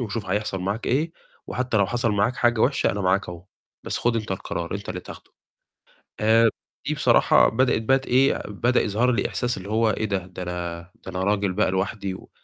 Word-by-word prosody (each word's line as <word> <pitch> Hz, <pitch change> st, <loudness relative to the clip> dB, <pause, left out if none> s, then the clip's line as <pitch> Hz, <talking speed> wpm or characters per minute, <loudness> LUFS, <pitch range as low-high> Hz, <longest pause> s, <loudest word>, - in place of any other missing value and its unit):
وشوف 110 Hz, -2 st, -4 dB
هيحصل 100 Hz, 0 st, -1 dB
معاك 100 Hz, +5 st, -3 dB
إيه، 155 Hz, +6 st, 0 dB, 0.3 s
وحتى 125 Hz, +2 st, -2 dB
لو 100 Hz, -, +4 dB
حصل 120 Hz, +2 st, 0 dB
معاك 105 Hz, +5 st, +1 dB
حاجة 120 Hz, -2 st, +2 dB
وحشة 135 Hz, +5 st, +2 dB
أنا 100 Hz, -, -3 dB
معاك 95 Hz, 0 st, +1 dB
أهو، 85 Hz, 0 st, -8 dB, 0.4 s
بس -, -, -2 dB
خُد 120 Hz, -1 st, +1 dB
أنت 110 Hz, -2 st, -4 dB
القرار، 85 Hz, -1 st, -4 dB
أنت 100 Hz, +1 st, -6 dB
اللي -, -, -4 dB
تاخدُه"، -, -, -12 dB, 0.9 s
آآ 115 Hz, +1 st, +5 dB, 0.4 s
دي -, -, +1 dB
بصراحة -, -, +4 dB
بدأت 125 Hz, -1 st, +2 dB
بقي 135 Hz, +4 st, +3 dB
ت 135 Hz, -, -13 dB
إيه، 130 Hz, +2 st, +3 dB
بدأ 120 Hz, +4 st, +1 dB
يظهر 115 Hz, +5 st, +1 dB
لي 120 Hz, -, 0 dB
إحساس 125 Hz, 0 st, -2 dB
اللي 95 Hz, +1 st, -8 dB
هو 110 Hz, +1 st, +2 dB
إيه 110 Hz, -, -2 dB
ده، 100 Hz, -2 st, 0 dB
ده 90 Hz, 0 st, -7 dB
أنا 85 Hz, -1 st, -5 dB
ده 95 Hz, -, -6 dB
أنا 95 Hz, 0 st, -2 dB
راجل 100 Hz, -1 st, +1 dB
بقى 105 Hz, 0 st, +1 dB
لوحدي 95 Hz, +1 st, -2 dB
و -, -, -12 dB
105 Hz, 205 wpm, -24 LUFS, 95-120 Hz, 0.9 s, آآ